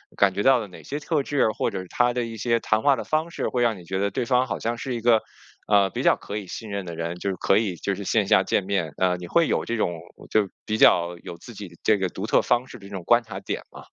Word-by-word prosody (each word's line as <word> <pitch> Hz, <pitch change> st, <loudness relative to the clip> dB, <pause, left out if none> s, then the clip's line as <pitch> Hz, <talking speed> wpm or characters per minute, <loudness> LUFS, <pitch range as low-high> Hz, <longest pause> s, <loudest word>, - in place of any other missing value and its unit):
感 100 Hz, -1 st, +4 dB
觉 100 Hz, -, 0 dB
到 135 Hz, -2 st, +5 dB
了 110 Hz, -, -5 dB
哪 90 Hz, -, -13 dB
些 145 Hz, -, -4 dB
特 150 Hz, -1 st, 0 dB
质？ 140 Hz, -5 st, +1 dB
或 -, -, 0 dB
者 95 Hz, -2 st, -4 dB
他 120 Hz, 0 st, +2 dB
的 125 Hz, 0 st, -1 dB
一 115 Hz, -1 st, -7 dB
些 115 Hz, +1 st, +1 dB
谈 110 Hz, 0 st, +1 dB
话 140 Hz, -1 st, +5 dB
的 -, -, -5 dB
方 155 Hz, +2 st, -1 dB
式 -, -, -2 dB
会 125 Hz, -1 st, 0 dB
让 115 Hz, -3 st, +1 dB
你 -, -, -12 dB
觉 95 Hz, +3 st, -3 dB
得 100 Hz, +1 st, 0 dB
对 125 Hz, +4 st, -2 dB
方 125 Hz, +1 st, +3 dB
好 100 Hz, -5 st, -4 dB
像 115 Hz, +1 st, -2 dB
是 130 Hz, +1 st, -4 dB
一 120 Hz, -, -3 dB
个， 115 Hz, -1 st, +4 dB, 0.5 s
呃， 100 Hz, -2 st, +4 dB
比 -, -, -4 dB
较 -, -, +5 dB
可 105 Hz, -, -6 dB
以 105 Hz, -, -5 dB
信 110 Hz, +4 st, -7 dB
任 100 Hz, -2 st, -4 dB
的 85 Hz, -1 st, -6 dB
人？ 85 Hz, +1 st, -3 dB
就 100 Hz, -, -3 dB
是 -, -, -4 dB
可 95 Hz, -, +3 dB
以 105 Hz, -5 st, 0 dB
就 100 Hz, +3 st, -2 dB
是 100 Hz, -, -6 dB
线 -, -, +1 dB
下 -, -, +5 dB
见 -, -, +1 dB
面， 95 Hz, -6 st, -1 dB
呃， 90 Hz, -1 st, +2 dB
你 90 Hz, -, -8 dB
会 170 Hz, -, +3 dB
有 -, -, 0 dB
这 115 Hz, -, -2 dB
种 110 Hz, -, +1 dB, 0.4 s
就 105 Hz, -2 st, +2 dB, 0.2 s
比 110 Hz, -, 0 dB
较 85 Hz, -4 st, +4 dB
有 85 Hz, -, -7 dB
自 120 Hz, -, -11 dB
己 100 Hz, -1 st, -7 dB
的 85 Hz, -, -16 dB
这 110 Hz, -, +4 dB
个 95 Hz, -2 st, -1 dB
独 95 Hz, +4 st, -5 dB
特 -, -, +3 dB
方 125 Hz, +1 st, +1 dB
式 -, -, -10 dB
的 100 Hz, -, -13 dB
这 100 Hz, -, -12 dB
种 95 Hz, -3 st, -5 dB
观 120 Hz, +6 st, +4 dB
察 110 Hz, -, -7 dB
点 -, -, -4 dB
吗？ -, -, -11 dB
105 Hz, 325 characters per minute, -24 LUFS, 95-120 Hz, 0.5 s, 到